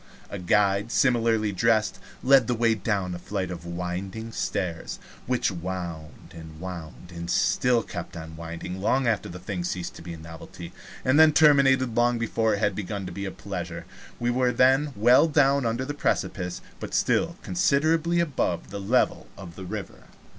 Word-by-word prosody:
A 100 - -5
guide, 100 +4 +2
similarly 115 -5 +2
dressed, 110 +2 +1 0.2
led 135 -3 +5
the 125 - +1
way 115 0 +3
down 100 -3 -1
a 90 - -6
flight 95 0 -3
of 85 -1 -7
winding 90 +6 -5
stairs, 90 -6 -3 0.3
which 125 -4 +1
wound 85 -2 -6
and 80 -1 -11
wound, 90 -1 -8
and 85 0 -7
still 120 +5 +2
kept 85 0 -7
on 80 0 -8
winding 85 +3 -6
long 130 +6 +2
after 115 -4 0
the 90 - -7
thing 90 0 -4
ceased 90 0 -3
to - - -11
be 85 0 -7
a - - -8
novelty, 85 +1 -10 0.3
and 130 +4 +4
then 160 -1 +8
terminated 135 -5 +5
long 120 0 +3
before 115 -1 +1
it - - -4
had 105 - +2
begun 100 0 -4
to 90 - -6
be 100 +3 -5
a 95 - -4
pleasure. 85 -4 -6 0.3
We 120 0 +1
were 125 0 +2
then 135 +4 +3
well 120 +9 +5
down 140 -4 +3
under 115 +3 -1
the 145 - -4
precipice, 90 -10 -2 0.2
but - - -5
still 170 +2 +1
considerably 165 0 +2
above 130 - -1
the 100 - -5
level 95 - +1
of 85 -3 -10
the 95 - -8
river. - - -7
100 Hz, 175 wpm, -26 LUFS, 90-125 Hz, 0.3 s, then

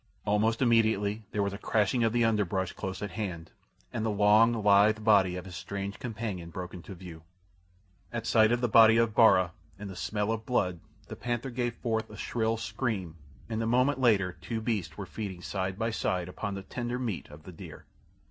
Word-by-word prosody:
Almost 110 +4 +2
immediately 110 -3 +2
there 105 - 0
was 100 0 -2
a 100 - -7
crashing 110 +3 +1
of 115 - +2
the 120 0 +2
underbrush 100 -4 0
close 95 +1 -5
at 100 - -4
hand, 90 -7 -5 0.4
and 115 -2 -2
the 110 - 0
long, 105 +2 +5
lithe 105 -1 +4
body 100 -4 +4
of 90 0 -6
his 90 -2 -9
strange 100 +1 -5
companion 110 -9 -5
broke 90 +1 -7
into 90 +2 -9
view. 85 -3 -10 0.9
At 120 -1 -4
sight 110 -1 +4
of 120 0 +1
the 120 - +2
body 110 0 +7
of 115 -2 +2
Bara 95 -6 +5 0.3
and 100 0 -7
the - - -9
smell 105 +3 -2
of 110 -1 -3
blood 90 -8 0 0.3
the - - -7
panther 120 +2 -3
gave 120 -1 -2
forth 110 -2 -2
a 105 - -11
shrill 115 +1 -1
scream, 110 -6 -3 0.3
and 110 -1 -3
a 115 - -1
moment 125 +4 +2
later 105 -7 +3
two 115 -2 -3
beasts 105 -9 -3
were 100 - -5
feeding 95 -2 -6
side 95 -1 -3
by 115 +1 -1
side 90 -5 -1
upon 100 +2 -5
the 100 - -6
tender 120 +3 -4
meat 115 -8 -4
of 75 +1 -13
the 95 - -10
deer. 85 - -11
105 Hz, 200 wpm, -29 LUFS, 95-115 Hz, 0.9 s, body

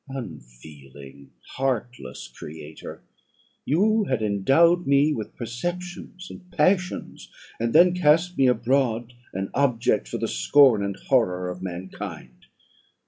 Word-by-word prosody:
Unfeeling, 70 - -11 0.3
heartless 120 - -3
creator! 75 +5 -10 0.6
you 210 +8 +2
had 130 - -1
endowed 135 - +3
me 140 +2 +3
with 110 -6 -6
perceptions 175 - -6
and 180 - -13
passions, 180 +3 -1 0.3
and 115 0 -1
then 175 +5 +6
cast 175 +1 +2
me 135 - +3
abroad 125 -2 0 0.2
an 95 +1 -4
object 125 -5 +1
for - - -4
the - - -2
scorn 110 - +4
and 100 -1 -3
horror 90 -9 +1
of 90 0 -9
mankind. 95 0 -8
125 Hz, 115 wpm, -24 LUFS, 90-155 Hz, 0.6 s, then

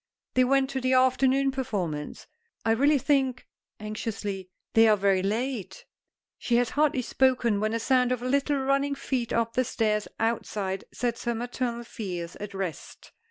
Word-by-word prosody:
"They 255 - +4
went 270 +1 +2
to 265 -1 -2
the 255 +1 +1
afternoon 260 +1 +3
performance. 190 - -3 0.4
I 225 - +3
really 285 +6 +4
think," 265 -2 +1 0.3
anxiously, 210 -3 -4 0.2
"they 225 0 +6
are 215 -1 +5
very 195 -1 +2
late 240 - -3 0.3
" - - -66 0.2
She 240 - 0
has 240 -1 +2
hardly 290 -4 +2
spoken 245 -5 +2
when 215 +1 0
a - - 0
sound 250 +1 +2
of 250 -1 -1
little 280 +3 +1
running 275 +1 +1
feet 255 -4 -2
up 230 0 0
the 255 - +2
stairs 215 -4 0
outside 210 -4 -2
sets 240 0 -3
her 235 0 0
maternal 240 0 -3
fears 180 -7 -6
at 205 -1 -7
rest. 185 -6 -6
240 Hz, 160 wpm, -27 LUFS, 210-265 Hz, 0.4 s, they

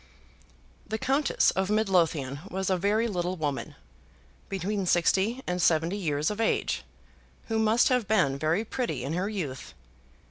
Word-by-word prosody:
The 220 - -2
Countess 270 +5 +2
of 190 0 -1
Midlothian 170 -10 +1
was 190 0 -2
a - - +4
very 205 +5 +1
little 180 -3 -2
woman, 145 -3 -3 0.7
between 195 +1 -2
sixty 195 +9 +2
and 180 0 -2
seventy 165 +3 +2
years 155 -4 -1
of 210 +2 -3
age, 225 - 0 0.7
who 225 0 +1
must 220 +2 +4
have 250 -5 +1
been 150 -11 +2
very 165 +8 +1
pretty 220 - -3
in 140 +4 -3
her 185 +4 -1
youth. 155 -12 -5
190 Hz, 145 wpm, -27 LUFS, 160-215 Hz, 0.7 s, a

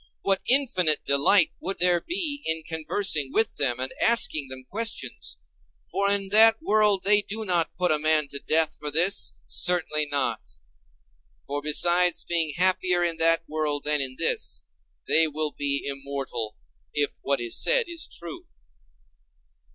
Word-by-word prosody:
What 195 -1 +1
infinite 190 - +2
delight 145 +6 +4
would 195 +1 -2
there 175 -1 +2
be 325 -6 -3
in 160 0 -2
conversing 160 -2 -1
with 220 +6 -1
them 125 -3 0
and 130 +1 -4
asking 155 -11 +3
them 130 0 -9
questions! 225 - -3 0.5
For 200 0 0
in 200 -1 0
that 225 +2 +5
world 210 -2 +1
they 210 +1 +5
do 215 +2 -5
not 175 -4 0
put 180 -1 +1
a 155 - +2
man 155 -1 +2
to 140 - -5
death 160 +2 +2
for 150 - -3
this; 175 +7 +1
certainly 155 -4 +1
not. 135 -6 -2 1.0
For 145 +1 -5
besides 175 +4 +2
being 165 -4 -1
happier 180 -1 +2
in 170 -1 -1
that 165 0 +3
world 150 -2 -2
than 150 -1 +1
in 130 -1 -4
this, 65 - -1 0.4
they 160 0 +4
will 155 0 -3
be 140 -1 -3
immortal, 135 -5 -6 0.4
if 145 -1 -3
what 140 0 -2
is 120 -1 0
said - - +2
is 340 -1 -5
true. 170 -2 -10
160 Hz, 150 wpm, -24 LUFS, 145-195 Hz, 1.0 s, that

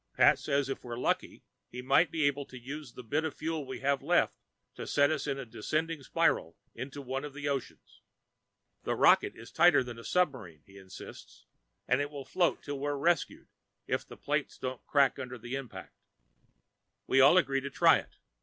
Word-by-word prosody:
Pat - - +5
says 140 -1 0
if 135 - -5
we're 120 -1 -6
lucky, - - -2 0.3
he 125 +1 -7
might 140 +5 +4
be 160 0 -1
able 145 0 +1
to 130 - -11
use 135 +1 -8
the 125 - -10
bit 145 +8 -1
of 160 -3 -3
fuel 155 -3 -3
we 130 - -6
have 140 -1 +1
left - - +2 0.4
to - - -7
set 145 +1 +3
us 150 -2 -2
in 140 -1 -1
a 135 - -6
descending 155 +8 -2
spiral 135 - 0 0.2
into 140 +2 -7
one 135 +1 -3
of 145 -1 -8
the 145 0 -4
oceans. 140 -2 -5 0.8
The - - -2
rocket - - +4
is 115 - -12
tighter 170 -4 +5
than 120 -2 -8
a - - -10
submarine, 120 - -1
he 100 0 -15
insists, 95 -1 -12 0.4
and 125 +3 +2
it 145 - -2
will 140 -2 -8
float 175 +3 0
till 145 -1 -5
we're 145 +1 -2
rescued, 165 +2 0 0.4
if - - -1
the - - -13
plates - - -2
don't 130 -1 -5
crack 140 -3 +3
under 125 0 -6
the 120 +2 -8
impact. 135 -4 -7 1.1
We 135 - +4
all 140 +7 +7
agreed 135 -6 +2
to 140 - -5
try - - +5
it. - - -13
140 Hz, 195 wpm, -30 LUFS, 125-145 Hz, 1.1 s, all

